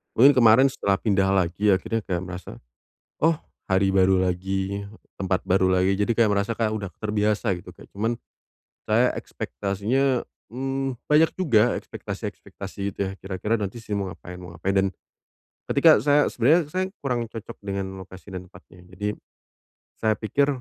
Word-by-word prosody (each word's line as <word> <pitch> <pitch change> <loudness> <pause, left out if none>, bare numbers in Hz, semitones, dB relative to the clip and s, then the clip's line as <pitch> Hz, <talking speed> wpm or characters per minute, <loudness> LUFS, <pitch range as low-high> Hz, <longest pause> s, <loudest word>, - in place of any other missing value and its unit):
Mungkin 135 +5 +8
kemarin 130 +1 +6
setelah 100 -5 +1
pindah 95 -2 +1
lagi 95 +1 +2
akhirnya 115 +4 -2
kayak 90 -4 -3
merasa, 90 -1 -8 0.7
"Oh 165 0 +4 0.3
hari 95 0 +3
baru 95 -1 +4
lagi, 95 +2 -2 0.3
tempat 95 -1 0
baru 95 0 +3
lagi." 95 +2 +2
Jadi 110 +2 +1
kayak 110 -3 +4
merasa, 100 +3 0
kayak 110 -2 0
udah 105 -3 -3
terbiasa 105 0 0
gitu. - - -16
Ya - - -14
cuman, 110 +4 -1 0.7
saya - - +3
ekspektasinya, 120 +7 -1 0.3
mmm, 135 +1 -2 0.2
banyak 155 +2 +5
juga 120 -11 +3
ekspektasi-ekspektasi 100 0 -8
gitu - - -22
ya, - - -5
"Kira-kira 95 +4 -2
nanti 105 +2 -4
saya 105 -2 -3
mau 95 -3 -3
ngapain, 90 +1 -10
mau 90 -1 -10
ngapain." 95 +3 -1
Dan, 95 0 +3 0.8
ketika 155 +3 +6
saya, 145 0 +4
sebenarnya 150 +5 +2
saya 185 +1 0 0.2
kurang 120 -3 -1
cocok 110 -1 -8
dengan 100 -1 -3 0.2
lokasi 95 +1 -12
dan 90 -1 -7
tempatnya. 90 -1 -16 0.2
Jadi, 105 +2 -1 0.9
saya 110 -1 +2
pikir, 140 +7 +1
105 Hz, 155 wpm, -25 LUFS, 95-120 Hz, 0.9 s, Mungkin